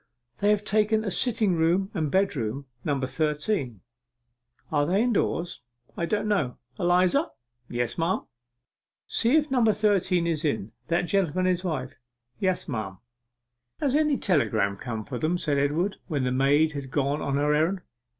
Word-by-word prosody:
'They 205 - +2
have 210 0 +2
taken 215 +1 +2
a 200 - -1
sitting 220 -3 +2
room 175 +4 +1
and 160 -6 -1
bedroom, 140 - 0 0.2
number 140 -3 0
thirteen.' 150 - -1 0.9
'Are 145 -2 +2
they 195 +6 +2
indoors?' 190 -7 -1 0.3
'I 170 - -1
don't 210 +2 0
know. 155 -12 0 0.2
Eliza!' 180 - +3 0.4
'Yes, 120 +4 -2
m'm.' 170 +3 0 0.8
'See 235 +5 +2
if 300 -2 +2
number 240 -4 +4
thirteen 195 -4 +2
is 165 -2 0
in 110 -8 -1 0.2
that 170 +1 +1
gentleman 185 -1 +1
and - - +3
his 180 - -10
wife.' 145 -7 -4 0.4
'Yes, 185 -2 0
m'm.' 110 - -4 0.8
'Has 280 -2 +1
any 300 -2 +3
telegram 110 - +1
come 110 0 -5
for 125 -3 -5
them?' 165 +3 +1
said 150 -5 0
Edward, 160 +8 0
when 145 -6 -1
the 125 - 0
maid 140 +4 +3
had 140 -3 -6
gone 140 +2 0
on 140 - -1
her 145 +1 +2
errand. 165 +5 +1
165 Hz, 160 wpm, -26 LUFS, 140-200 Hz, 0.9 s, number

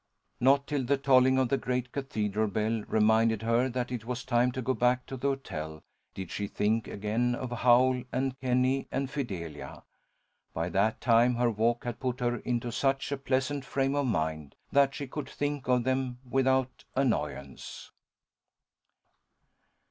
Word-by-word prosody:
Not 140 +2 +4
till 145 -2 -1
the 140 +3 +1
tolling 130 -1 +4
of 130 -2 +2
the 135 - +1
great 125 0 -2
cathedral 110 -6 -1
bell 110 +2 -1
reminded 110 0 +3
her 115 +3 +2
that 125 0 -3
it 120 -3 -4
was 125 +1 -4
time 125 0 +2
to 130 - -3
go 130 - +1
back 125 0 +1
to 135 - -6
the 130 +2 -2
hotel, 80 - -4 0.3
did 95 -2 -6
she 100 - -3
think 110 +3 0
again 115 +4 -1
of 125 0 -5
Howl 125 +1 +4
and 130 0 -1
Kenny 130 +1 +1
and 135 0 -2
Fidelia. 90 - -5 0.7
By 80 +2 -1
that 100 +4 +1
time 120 0 +4
her 120 0 +2
walk 115 +2 0
had 120 -1 -5
put 130 0 -2
her 120 -1 0
into 120 -1 -2
such 135 +3 0
a 140 - -1
pleasant 135 +1 -1
frame 135 0 0
of 145 -2 0
mind, 80 - -2 0.2
that 140 -1 +3
she 140 - -4
could 140 +1 -6
think 145 -2 -3
of 125 -1 +3
them 130 -1 -1
without 130 0 +1
annoyance. 75 - -2
125 Hz, 165 wpm, -29 LUFS, 110-130 Hz, 0.7 s, Not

